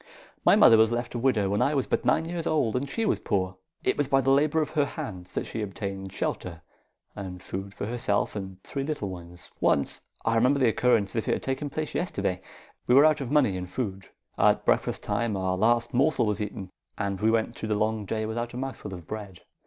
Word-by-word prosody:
My - - +6
mother 115 - +7
was 110 0 +5
left 120 0 -2
a 120 - -2
widow 115 -6 +2
when 100 - +1
I 150 - +2
was 135 - +1
but - - 0
nine 160 0 +2
years 170 -1 -3
old 130 -8 +1
and 135 +2 -1
she 225 +9 -1
was - - +1
poor. 95 -2 -1 0.3
It - - +1
was 145 - +1
by 135 0 +4
the 135 0 +2
labour 150 +3 +3
of - - -7
her 150 -2 +2
hands 95 - -7
that - - -2
she 115 - -4
obtained 95 -1 -5
shelter 85 -3 -4 0.5
and 95 -2 -6
food 95 +2 -6
for - - -4
herself 110 -3 -1
and 95 -2 -6
three 140 - -4
little 145 -9 -3
ones. 90 -1 -10
"Once, 70 - +1 0.2
I 115 - +2
remember 125 +5 +3
the 125 -3 +4
occurrence 110 -4 +2
as - - -5
if 110 - -1
it - - +3
had - - -6
taken 135 +2 -2
place 155 +3 -4
yesterday, 100 - -1 0.5
we 125 - +5
were 140 +3 +8
out 155 -1 +3
of 130 - -4
money 135 -9 +3
and 90 0 -5
food. 95 -4 -4 0.3
At - - +4
breakfast - - +1
time 115 -4 -1
our 95 -1 0
last 120 +4 +2
morsel 130 -1 +3
was 105 0 -1
eaten, 100 -2 -5 0.3
and 100 -2 -2
we 110 - +4
went 115 +1 +1
through 110 - -5
the 105 - +1
long 110 0 0
day 110 +2 -2
without 120 +2 -3
a - - -4
mouthful 130 -7 -5
of 85 -2 -11
bread. 100 -3 -7
110 Hz, 230 wpm, -27 LUFS, 95-135 Hz, 0.5 s, were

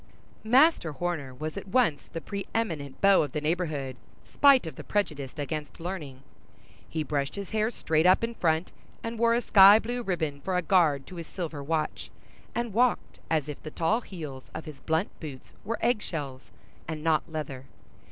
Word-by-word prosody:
Master 250 - +4
Horner 160 -4 -3
was 155 +7 -6
at 200 - -6
once 195 - +1
the 165 - -5
preëminent 190 -8 -3
beau 195 -1 +6
of 145 -4 -3
the 150 - 0
neighborhood, 150 -5 -2 0.3
spite 275 -7 +5
of 160 - -6
the - - -8
prejudice 150 -10 -2
against 150 +2 -4
learning. 155 -7 -6 0.7
He 160 -1 -2
brushed 140 -1 -2
his 200 -2 -6
hair 220 0 +1
straight 160 -7 +1
up 185 +4 +5
in 230 +1 -1
front, 165 -4 0 0.3
and 230 0 -4
wore 230 0 +4
a 240 - +1
sky 200 -2 +8
blue 240 +2 -3
ribbon 160 -9 -2
for 185 -1 -1
a 180 - 0
guard 155 -7 +3
to 180 - -10
his 165 -2 -6
silver 165 -6 -5
watch, 155 +1 -2 0.5
and 235 -3 -2
walked 245 +2 +1
as 155 -3 +1
if 150 - -7
the 155 - -7
tall 170 +10 +1
heels 150 - -8
of 160 - -6
his 150 -3 -10
blunt 160 +4 0
boots 145 -5 -9
were 230 +3 -2
egg 235 -2 +2
shells 140 -8 -6 0.4
and 155 -1 -5
not 160 0 +1
leather. 140 -4 -5
165 Hz, 180 wpm, -28 LUFS, 150-200 Hz, 0.7 s, sky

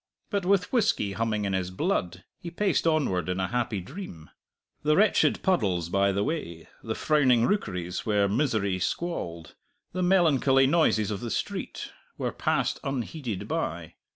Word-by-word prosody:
But 200 -4 -1
with 195 +1 +2
whisky 215 - +2
humming 110 0 -1
in 100 - -1
his 95 -1 -1
blood 95 - -2 0.2
he 170 - -6
paced 185 -1 0
onward 115 - +1
in 90 +1 -1
a 95 - -1
happy 120 -4 -1
dream. 95 - -9 0.5
The 150 0 +3
wretched 210 +4 +3
puddles 95 - +1
by 100 +2 +2
the 100 +1 0
way, 85 - -4
the 110 -1 -4
frowning 130 -6 +3
rookeries 90 - -2
where 105 -3 +2
misery 100 -5 0
squalled, 85 - -3 0.4
the 185 - -2
melancholy 150 -8 +4
noises 130 -8 +2
of 100 - -3
the 120 - -4
street, - - -4 0.3
were - - -2
passed - - 0
unheeded 130 - -4
by. - - -3
115 Hz, 155 wpm, -27 LUFS, -, 0.5 s, melancholy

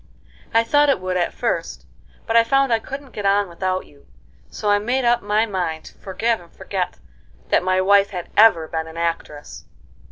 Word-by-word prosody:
"I 230 0 +3
thought 290 +5 +3
it 275 - +2
would 185 0 -3
at 175 -1 0
first, - - -3 0.4
but 225 - -2
I 230 - +7
found 270 +1 +2
I 225 - +2
couldn't 275 +3 -8
get 205 - -6
on 200 0 +2
without 185 +2 -3
you, 140 -1 -22 0.4
so 210 - -5
I 205 - +4
made 245 +5 -1
up 240 0 +3
my 210 +2 +1
mind 175 -6 -3
to - - -12
forgive 220 +3 -2
and 170 - -18
forget 185 -3 -4 0.5
that - - +3
my 185 +1 +1
wife 200 +1 +4
had 180 -3 -7
ever 205 -7 +5
been 160 0 -4
an 160 +1 -11
actress." 165 -3 -4
200 Hz, 195 wpm, -21 LUFS, 180-230 Hz, 0.5 s, I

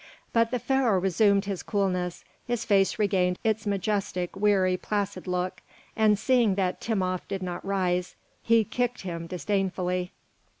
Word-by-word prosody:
But 230 0 +3
the 250 - 0
Pharaoh 245 -4 +2
resumed 195 +2 +3
his 195 -2 -3
coolness, 180 -4 -1 0.2
his 240 -1 -1
face 195 -3 +3
regained 185 -4 +1
its 220 -1 0
majestic, 200 -2 -1
weary, 195 -2 +3
placid 200 +1 -3
look, 180 0 -2 0.3
and 215 -2 +4
seeing 235 -4 +3
that 185 -2 -1
Timopht 185 -5 -1
did 195 -1 -4
not 180 -1 -4
rise, 180 -2 -1 0.3
he 230 -1 +4
kicked 245 +3 -2
him 170 -3 -5
disdainfully. 185 -1 -1
195 Hz, 140 wpm, -27 LUFS, 180-215 Hz, 0.3 s, and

